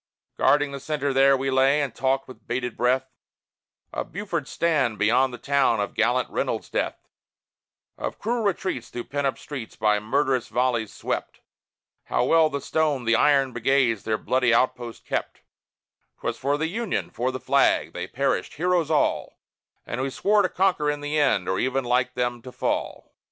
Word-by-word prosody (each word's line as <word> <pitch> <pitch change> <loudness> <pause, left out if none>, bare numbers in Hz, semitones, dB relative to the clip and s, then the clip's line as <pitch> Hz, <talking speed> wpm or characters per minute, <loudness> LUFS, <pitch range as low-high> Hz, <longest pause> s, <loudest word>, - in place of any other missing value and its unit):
Guarding 145 -1 +3
the 140 - -6
centre 145 -1 -2
there, 135 0 +5
we 135 +1 -1
lay, 135 +2 +4
and 140 -4 -2
talked 135 0 0
with 115 -3 -14
bated 125 0 -2
breath 130 +2 +1 0.9
Of - - -4
Buford's 175 -8 -4
stand 145 -10 +1
beyond 120 +6 +3
the 120 - -7
town, 140 -5 +2
of 100 - -2
gallant 120 +3 +1
Reynold's - - -2
death, - - -3 0.9
Of - - -4
cruel 235 +2 -1
retreats 185 - -2
through 120 - -5
pent 140 +1 -2
up 135 - -2
streets 130 -6 -8
by 105 -1 +2
murderous 130 +3 0
volleys 120 -3 0
swept, - - -4 0.6
How - - 0
well 160 +4 +4
the 140 -1 -4
Stone, 150 -4 0
the 115 +1 +3
Iron, 135 0 +3
Brigades 120 -2 +2
their 110 -1 -1
bloody 125 +1 +1
outposts 120 0 0
kept: - - -3 0.8
'Twas - - -2
for 140 +2 0
the 160 - -1
Union, 215 +5 -2
for 125 +3 -1
the 130 - -5
Flag, - - +2
they - - -5
perished, - - -1
heroes 175 0 +1
all, 155 -2 0 0.5
And 120 - -4
we 135 - -1
swore 205 +9 +2
to 185 - +1
conquer 180 -6 +1
in 145 0 -2
the 145 +1 -1
end, 130 -11 +2
or 95 0 0
even 130 +1 0
like 125 +1 0
them 120 -1 -1
to 125 - -10
fall. - - -3
135 Hz, 175 wpm, -25 LUFS, 120-145 Hz, 0.9 s, there